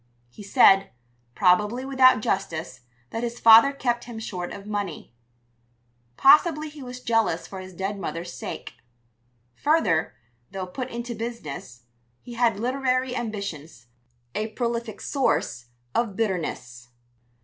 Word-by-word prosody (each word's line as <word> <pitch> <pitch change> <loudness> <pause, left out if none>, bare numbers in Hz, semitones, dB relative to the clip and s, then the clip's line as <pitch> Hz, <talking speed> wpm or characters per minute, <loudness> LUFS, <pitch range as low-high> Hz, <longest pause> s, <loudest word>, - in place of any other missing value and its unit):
He 210 - -13
said 195 -2 +5 0.5
probably 210 +7 +2
without 260 -4 +5
justice 165 -8 -2 0.3
that 225 - -3
his 240 0 -4
father 230 +4 +8
kept 240 -3 -2
him 235 -2 -8
short 180 -5 -5
of 200 - -9
money. 205 - -5 1.0
Possibly 305 +2 +5
he 295 -1 -12
was 250 -1 -8
jealous 225 -8 +1
for 190 - -8
his 185 0 -9
dead 195 +3 -4
mother's 170 0 -5
sake. - - -7 0.8
Further, 215 - +1 0.3
though 190 -1 -5
put 250 +8 -6
into 235 0 -5
business, 155 - -7 0.4
he 245 - -11
had 230 -4 +1
literary 255 +1 0
ambitions 200 - -5 0.5
a 215 +1 -2
prolific 235 -1 -3
source 135 - -1 0.3
of 230 -4 0
bitterness. 155 - -3
220 Hz, 125 wpm, -25 LUFS, 185-245 Hz, 1.0 s, father